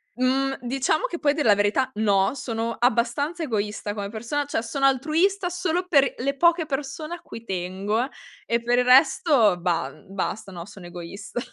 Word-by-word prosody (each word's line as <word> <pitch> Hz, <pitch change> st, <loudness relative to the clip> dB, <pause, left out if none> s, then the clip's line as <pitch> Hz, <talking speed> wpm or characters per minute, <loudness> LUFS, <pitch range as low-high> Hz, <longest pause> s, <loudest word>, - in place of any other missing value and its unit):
Mhmm, 270 Hz, +2 st, +1 dB
diciamo 270 Hz, -, 0 dB
che 345 Hz, -8 st, -4 dB
poi 285 Hz, -, +4 dB
a -, -, -1 dB
dir 300 Hz, -, -1 dB
la 210 Hz, -, +7 dB
verità 205 Hz, +6 st, +1 dB
no, 205 Hz, 0 st, +2 dB
sono 230 Hz, -3 st, -3 dB
abbastanza 245 Hz, +8 st, +1 dB
egoista 210 Hz, -4 st, -2 dB
come 200 Hz, -1 st, -4 dB
persona, 235 Hz, +7 st, -3 dB
cioè 270 Hz, -5 st, -2 dB
sono 275 Hz, +4 st, -1 dB
altruista 325 Hz, +8 st, +2 dB
solo 360 Hz, 0 st, -1 dB
per 280 Hz, -5 st, +5 dB
i -, -, -3 dB
le 275 Hz, +3 st, -1 dB
poche 340 Hz, +2 st, +3 dB
persone 295 Hz, +3 st, -4 dB
a 345 Hz, -, -14 dB
cui 230 Hz, -, -10 dB
tengo, 195 Hz, +5 st, -2 dB, 0.4 s
e 235 Hz, 0 st, +1 dB
per 245 Hz, +1 st, +2 dB
il 250 Hz, -, +2 dB
resto 255 Hz, -, +5 dB
bah, 170 Hz, -1 st, 0 dB
uhm, 195 Hz, -1 st, -16 dB
basta, 195 Hz, +1 st, -3 dB
no, 170 Hz, -2 st, -7 dB
sono 195 Hz, -3 st, -12 dB
egoista. 175 Hz, +7 st, -7 dB
245 Hz, 185 wpm, -24 LUFS, 205-290 Hz, 0.4 s, la